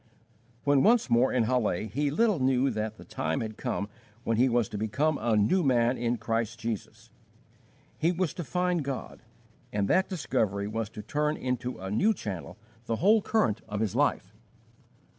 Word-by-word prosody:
When 140 -1 +4
once 225 - +4
more 120 +3 +4
in 125 -2 +2
Halle, 110 -5 0
he 145 +5 -1
little 205 +4 +2
knew 130 +1 +2
that 110 0 -3
the - - -12
time 80 +2 -2
had 110 -1 -5
come 100 - -3 0.4
when 115 -2 0
he 130 +3 +4
was 120 -3 +2
to 105 - -5
become 140 +8 0
a 115 -1 +2
new 145 - +3
man 125 -4 +3
in 120 0 -1
Christ 115 0 -2
Jesus. 115 -2 -5 0.9
He 165 +2 +3
was 180 -2 -1
to 175 - -5
find 180 +1 0
God, 135 -1 -5 0.5
and 100 -1 0
that 185 +1 +3
discovery 100 - -1
was 110 0 -3
to 105 - -9
turn 150 +1 -1
into 125 0 -3
a 95 +1 -6
new 210 - +3
channel 95 - -6 0.3
the 115 - 0
whole 210 - +4
current 195 - +1
of 105 0 -3
his 110 -3 -1
life. - - +1
125 Hz, 180 wpm, -28 LUFS, 110-150 Hz, 0.9 s, When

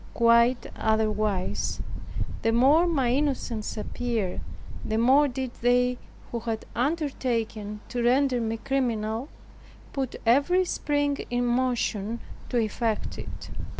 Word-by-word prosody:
Quite 235 +1 +4
otherwise, 215 -3 0 0.6
the 225 - +2
more 280 +9 +5
my 270 -8 +2
innocence 255 -6 -1
appeared, 220 -3 -2 0.4
the 220 - -1
more 265 +6 +5
did 260 -1 -3
they, 245 +1 +3 0.3
who 235 - -2
had 225 -1 -3
undertaken 235 -7 -1
to 245 - -2
render 250 +1 +3
me 225 0 -1
criminal, 235 -1 -1 0.6
put 265 -3 -2
every 285 +11 +4
spring 290 -4 0
in 245 0 0
motion 240 -3 0 0.3
to 245 - 0
effect 225 -1 -1
it. - - -8
240 Hz, 115 wpm, -27 LUFS, 225-265 Hz, 0.6 s, more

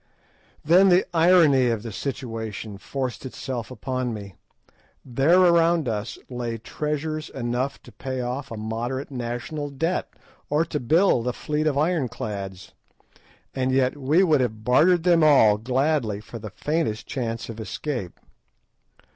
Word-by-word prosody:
Then 180 +5 +6
the 180 +1 +4
irony 165 -6 +5
of 115 -3 -1
the 115 - -6
situation 110 -4 -5
forced 130 +1 -4
itself 130 -2 -5
upon 130 -1 -3
me. 100 -2 -9 0.7
There 135 +8 +3
around 170 -3 +4
us 110 0 -3
lay 120 -2 -4
treasures 150 +5 -3
enough 125 +2 -2
to 120 - -14
pay 130 +4 -5
off 125 +3 -4
a 115 - -6
moderate 120 +6 -4
national 125 +4 -4
debt, 165 +6 -2 0.4
or 150 +3 +2
to 155 -2 -3
build 150 -2 +3
a 125 - 0
fleet 150 +3 -2
of 145 -2 +1
ironclads, 110 - -2 0.8
and 130 -1 0
yet 130 0 +2
we 145 +6 +3
would 155 -7 +3
have 110 -3 -2
bartered 160 +9 +4
them 170 -2 +4
all 110 -9 +6
gladly 125 -2 0
for 115 +2 -9
the 110 0 -7
faintest 150 -2 -2
chance 115 -4 -4
of 115 -1 -8
escape. 110 - -5
130 Hz, 140 wpm, -24 LUFS, 115-155 Hz, 0.8 s, Then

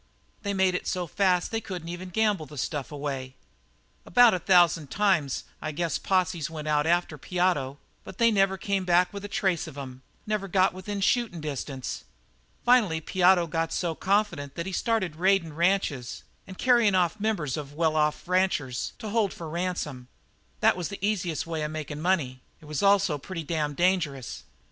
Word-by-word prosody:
They 200 0 -2
made 190 -1 +3
it 180 - -3
so 180 -2 -1
fast 180 +1 +1
they 225 0 -1
couldn't 180 -6 -6
even 180 +2 -6
gamble 205 -4 +1
the 150 - -11
stuff 140 0 -3
away. 135 -3 -5 0.7
About 245 +3 +6
a 185 - 0
thousand 170 -4 +4
times, 185 -9 +1 0.2
I 155 - -3
guess 165 +2 -1
posses 185 -5 0
went 155 -2 -6
out 150 0 +2
after 170 -3 +1
Piotto, 175 -6 0 0.3
but 190 - -11
they 230 -1 +4
never 195 -2 +2
came 195 0 -1
back 180 +1 +3
with 200 0 -6
a - - -4
trace 190 -5 0
of 150 -3 -10
'em; 130 -2 -8 0.2
they 215 - -6
never 205 -2 -1
got 185 0 +3
within 195 +2 -5
shootin' 220 -4 +1
distance. 140 -3 -5 0.6
Finally 220 -10 +4
Piotto 180 +2 +3
got 165 0 -2
so 170 -2 -1
confident 185 -7 0
that 170 - -4
he 190 - -4
started 190 -6 -1
raidin' 185 -3 +2
ranches 165 -7 0 0.2
and 190 -1 -10
carryin' 235 -6 +4
off 180 +3 +1
members 200 - -1
of 145 -1 -7
well 160 -1 +1
off 150 +2 0
ranchers 180 -9 0
to 220 - -6
hold 210 -3 +1
for 165 - -8
ransom. 155 -6 -3 0.5
That - - +5
was 180 -3 -3
the 200 0 -4
easiest 180 -6 -1
way 165 -1 -3
of 150 - -2
makin' 150 -1 -5
money; 150 -8 0 0.2
it - - -16
was 150 -1 -3
also 195 -6 +3
pretty 165 +3 -6
damned 150 -2 -2
dangerous. 160 - 0
175 Hz, 180 wpm, -27 LUFS, 150-195 Hz, 0.7 s, About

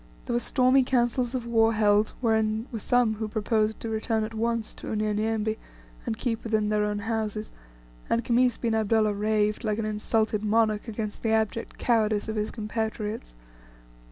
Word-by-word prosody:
There - - -2
were 240 - +2
stormy 255 +2 +3
councils 245 0 +1
of 245 -2 -3
war 225 -1 +3
held, 210 0 +3
wherein 220 -1 +1
were 225 - -4
some 245 +1 +2
who 215 0 -4
proposed 215 0 0
to 230 - -4
return 220 0 0
at 220 +1 -5
once 230 0 -1
to - - -10
Unyanyembe, 215 +1 0 0.5
and 110 - -1
keep 225 -2 -2
within 215 -2 0
their 210 0 +2
own 210 0 -1
houses; 215 0 -3 0.6
and 230 - +1
Khamis 245 0 +3
bin 230 -2 -1
Abdullah 220 -1 +2
raved, 210 +1 0
like 215 -2 0
an 225 - -2
insulted 215 0 0
monarch, 215 0 +1
against 215 -1 -5
the 225 - 0
abject 220 +1 -1
cowardice 220 -3 +1
of 220 - -3
his 210 0 -1
compatriots. 220 - -4
220 Hz, 170 wpm, -27 LUFS, 215-230 Hz, 0.6 s, stormy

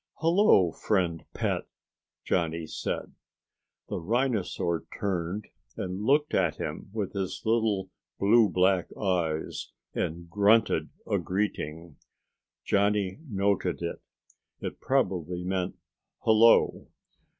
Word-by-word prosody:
"Hello, 165 - +4
friend 85 -4 0
pet," - - -1 0.6
Johnny 85 -2 0
said. - - -4 0.7
The - - -3
rhinosaur 100 -5 0
turned 95 +1 -2 0.3
and 95 +1 -4
looked 145 +7 +2
at 85 -4 +2
him - - -5
with 105 -3 -3
his 95 -2 -3
little 110 -3 +1 0.3
blue 105 +2 +5
black 90 0 +2
eyes 85 -6 -1 0.2
and 85 +2 -3
grunted 105 +5 +3 0.2
a - - +1
greeting. 85 -5 -3 0.7
Johnny 100 0 +1
noted 100 -4 0
it. 85 - -4 0.6
It - - -6
probably 90 - 0
meant 90 0 -2 0.5
"hello." 115 +1 +5
95 Hz, 100 wpm, -28 LUFS, 85-105 Hz, 0.7 s, blue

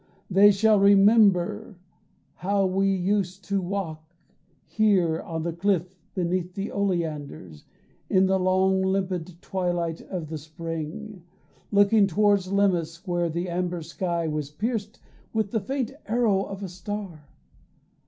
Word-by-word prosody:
They 200 +2 +7
shall 210 +1 +4
remember 200 -1 +4 0.6
how 195 +1 0
we 190 +1 +1
used 190 0 -1
to 200 -1 +1
walk 170 -4 -5 0.5
Here 185 -7 +2
on 160 -1 -5
the 170 0 -2
cliff 185 0 0 0.2
beneath 180 0 -1
the 200 0 -4
oleanders 150 - -3 0.4
In 190 0 +4
the 190 0 +2
long 190 +1 +2
limpid 185 -3 -1
twilight 175 -3 -2
of 170 -5 -6
the 160 -1 -5
spring, 165 +6 -6 0.5
Looking 205 0 +4
toward 205 +2 +3
Lemnos, 180 -4 0
where 175 -1 0
the 170 +3 -3
amber 175 -1 -2
sky 170 +1 -2
Was 150 -2 -3
pierced 215 +6 -3 0.3
with 220 -3 -1
the 225 - +1
faint 265 +3 -2 0.2
arrow 215 -4 +2
of 195 0 -7
a - - -3
star. 180 -4 -7
185 Hz, 130 wpm, -25 LUFS, 170-200 Hz, 0.6 s, They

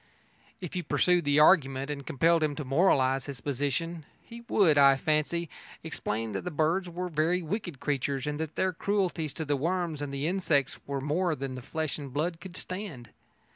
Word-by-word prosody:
If 180 -2 -6
you 180 - 0
pursued 180 -1 +2
the 145 +1 +4
argument 140 -4 +4
and 140 -1 -5
compelled 165 +5 +2
him 150 -2 0
to 150 - -5
moralise 135 -3 +3
his 140 -3 -6
position, 145 +5 -2 0.2
he 235 0 -11
would, 175 -8 +4
I 140 -1 +7
fancy, 155 +4 0 0.4
explain 110 +1 -3
that - - -3
the 180 - -3
birds 170 +4 0
were 180 +1 -4
very 170 +2 +1
wicked 175 - -4
creatures 140 -2 -1
and 150 0 -3
that 160 -1 -4
their 185 -1 +1
cruelties 180 -5 -1
to 160 - -4
the 145 0 +1
worms 165 +1 -1
and 145 -1 -4
the 140 +1 -3
insects 165 -6 +1
were 140 -1 -2
more 160 +4 0
than 130 -2 -5
flesh 155 +3 -3
and 140 -2 -7
blood 165 +5 -2
could 185 -1 -8
stand. 185 - -6
155 Hz, 185 wpm, -29 LUFS, 140-175 Hz, 0.4 s, I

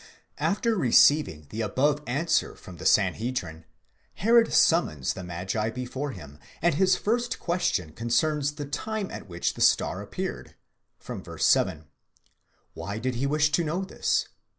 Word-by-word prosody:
After 225 +3 +1
receiving 130 - +4
the 110 - -3
above 140 +8 +1
answer 155 +6 0
from 90 -4 -12
the - - -2
Sanhedrim, 95 -5 0 0.5
Herod 230 +3 +4
summons 75 - +3
the 95 - -8
magi 95 +5 -3
before 125 +4 -4
him, 75 - -10 0.2
and 170 +1 +2
his 185 +4 +3
first 235 +2 -1
question 175 - -1
concerns 145 - 0
the 145 -1 -6
time 215 +8 -4
at 100 - -8
which 85 0 -2
the - - -8
star - - +3
appeared - - -6 0.4
(v. - - -7 0.2
7). 80 0 +2 0.9
Why 100 +1 -5
did 125 +3 -2
he 130 +3 -1
wish 150 +1 +2
to 170 +2 +2
know 170 +5 -2
this®? 190 - 0
140 Hz, 145 wpm, -26 LUFS, -, 0.9 s, receiving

